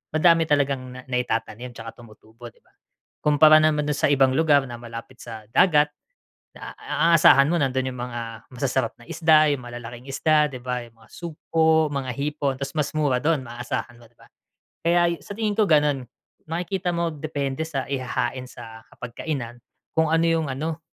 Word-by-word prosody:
madami 165 0 +4
talagang 140 -3 +1
na 130 - -8
naitatanim 125 -1 -3
'tsaka 115 +2 -10
tumutubo, 110 +2 -14
'di - - -30
ba? - - -31 0.5
Kumpara 155 +1 +6
naman 155 -1 +2
dun 150 - 0
sa - - +2
ibang 135 -2 +4
lugar 150 -4 +4
na 120 - -7
malapit 115 +2 -10
sa 110 -2 -9
dagat 150 -3 +4 0.7
na - - -9
a 170 0 +2
asahan 140 -2 +6
mo 175 - +1
nandun 130 -1 0
yung 125 - -7
mga 115 -2 -6
masasarap 125 -1 -1
na 120 - -14
isda, 155 -2 +4
yung 130 -3 -4
malalaking 120 0 -9
isda, 150 +2 +2
'di 125 - -7
ba 125 -1 -3
yung 115 -1 -18
mga 110 - -20
sugpo, 160 -1 +1
mga 135 -2 -3
hipon, 140 -1 -2
tapos 140 +3 -5
mas 145 -2 0
mura 145 -4 +2
dun 155 -2 +2
maaasahan 120 0 -5
mo, 120 - -17
'di - - -35
ba? - - -19 0.6
Kaya 170 0 +3
sa - - -12
tingin 215 -2 0
ko 215 - +4
ganun, 145 -4 +3 0.5
makikita 180 +2 -2
mo 170 0 0
depende 145 -1 -3
sa 140 -4 -3
ihahain 130 -1 -2
sa 115 -1 -11
hapagkainan, 120 -1 -6 0.4
kung 160 -1 +2
ano 165 +1 +3
yung 165 -2 +1
ano, 155 +4 -4
140 Hz, 175 wpm, -24 LUFS, 125-155 Hz, 0.7 s, Kumpara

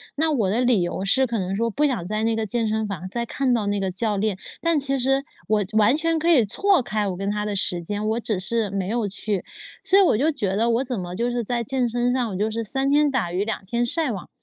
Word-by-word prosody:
那 315 +2 +1
我 220 -10 +1
的 225 +5 +1
理 245 -6 +3
由 180 +2 -3
是 260 +6 +3
可 230 -1 -2
能 190 0 -2
说 230 +2 0
不 295 +7 0
想 240 -12 -1
在 215 +1 -1
那 225 0 +1
个 225 - -1
健 225 +2 -1
身 220 0 -1
房 185 -2 -5
再 235 +2 -2
看 255 +1 0
到 215 -4 0
那 205 0 0
个 190 -1 -2
教 210 +2 -1
练， 210 -1 0 0.3
但 335 -3 +2
其 275 0 +1
实 270 +2 +1 0.2
我 215 -1 +2
完 220 +5 +4
全 330 +1 0
可 325 +2 -2
以 270 -9 +5
错 385 - +3
开 210 -3 -1
我 185 - -3
跟 195 +1 -3
他 210 0 -2
的 205 -1 -2
时 180 -2 +4
间， 205 +4 -3
我 225 +2 0
只 215 -4 -1
是 215 +2 +1
没 195 -2 -2
有 225 -1 -1
去。 200 0 -3 0.4
所 390 - +4
以 - - +7
我 340 - +3
就 305 +6 +2
觉 200 -9 -2
得 230 +3 +1
我 240 +3 +1
怎 245 -6 -4
么 175 0 -6
就 240 +3 -1
是 240 -1 -2
在 235 +1 -2
健 255 +1 0
身 240 +1 0
上 245 -4 -1
我 - - -5
就 210 +3 0
是 230 +1 -3
三 270 +5 0
天 295 +1 +3
打 220 -10 -1
鱼 190 +3 -1
两 220 - -3
天 240 +4 -1
晒 310 +2 +2
网， 195 -5 -6
225 Hz, 300 characters per minute, -23 LUFS, 205-255 Hz, 0.4 s, 以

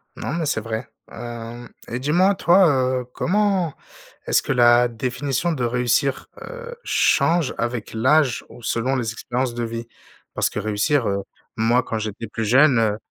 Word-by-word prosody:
Non - - -4
mais 170 -1 -1
c'est 110 - 0
vrai, 110 +2 -4 0.2
hem 120 0 -8 0.2
et 120 - -4
dis-moi 175 +9 +3
toi, 180 +1 +5 0.3
heu, - - -9
comment 195 -4 +1 0.5
est-ce - - +2
que - - -3
la 120 -1 +5
définition 130 +7 -2
de 135 -6 -2
réussir, 125 +3 0
heu, 485 -1 -8
change 165 -4 +2
avec 120 -1 -3
l'âge 130 +1 +2
ou 120 +1 -14
selon 120 +4 0
les 120 -4 -2
expériences 125 +2 -2
de 120 0 -3
vie? 115 0 -5 0.5
Parce - - 0
que - - -4
réussir, 110 +6 0
heu, 100 0 -1 0.3
moi 115 +3 +2
quand 110 - -3
j'étais 110 +1 -5
plus 110 +1 -4
jeune, 130 +3 +5
heu 105 -2 +1
120 Hz, 165 wpm, -22 LUFS, 115-150 Hz, 0.5 s, toi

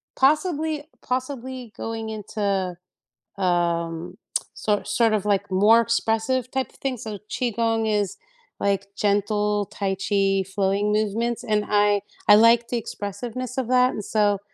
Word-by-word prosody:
possibly 305 +1 +2 0.2
possibly 255 -2 -4
going 225 +1 -4
into, 200 -3 -2 0.6
um, 170 -2 -1 0.4
sor 205 -1 0
sort 220 +2 +2
of, 210 -2 0
like, 200 -2 0
more 210 +5 +6
expressive 230 +2 0
type 265 -1 -1
of - - -24
thing. 270 -2 -2
So 220 -2 -6
qigong 230 -2 0
is, 205 -2 0 0.4
like, 200 0 -1
gentle 205 0 +1
tai 195 0 -2
chi 195 0 +1
flowing 195 +2 0
movements, 225 +3 0
and 210 -3 0
I 205 -1 +3 0.3
I 205 - +10
like 230 +2 +5
the 245 - 0
expressiveness 235 +4 -5
of 260 -3 -1
that, 250 0 +4
and 210 - -5
so 205 -2 +2
210 Hz, 135 wpm, -24 LUFS, 200-235 Hz, 0.6 s, I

